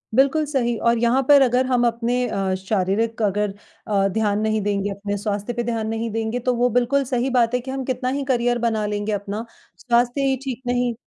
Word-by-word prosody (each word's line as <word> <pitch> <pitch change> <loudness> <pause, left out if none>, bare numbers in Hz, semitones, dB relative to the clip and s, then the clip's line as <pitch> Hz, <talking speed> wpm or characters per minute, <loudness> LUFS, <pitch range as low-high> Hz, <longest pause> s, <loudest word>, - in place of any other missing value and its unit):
बिल्कुल 275 +4 +3
सही 250 -5 0
और 235 - +2
यहाँ 240 +3 +2
पर 285 -1 +8
अगर 255 0 +3
हम 250 -2 +2
अपने 240 +2 0
अ, 195 -3 -1
शारीरिक 200 +4 -1
अगर 205 -1 0 0.3
अ, 195 -2 +2
ध्यान 205 +1 0
नहीं 215 0 0
देंगे, 205 0 -1
अपने 200 +1 -4
स्वास्थ्य 205 +3 -3
पे 240 - -2
ध्यान 225 -2 -2
नहीं 225 +1 -2
देंगे, 225 +2 -2
तो 250 +1 0
वो 245 +1 +2
बिल्कुल 245 +4 +2
सही 255 0 -1
बात 245 -2 +2
है 250 - +2
कि 260 +2 -6
हम 270 0 -3
कितना 255 0 -2
ही 275 +1 -2
करियर 245 -2 +1
बना 220 -2 0
लेंगे 205 +1 -2
अपना 205 +2 -3 0.3
स्वास्थ्य 245 +2 +1
ही 265 -1 +1
ठीक 260 -2 -5
नहीं 245 -1 +1
235 Hz, 210 wpm, -22 LUFS, 210-250 Hz, 0.3 s, पर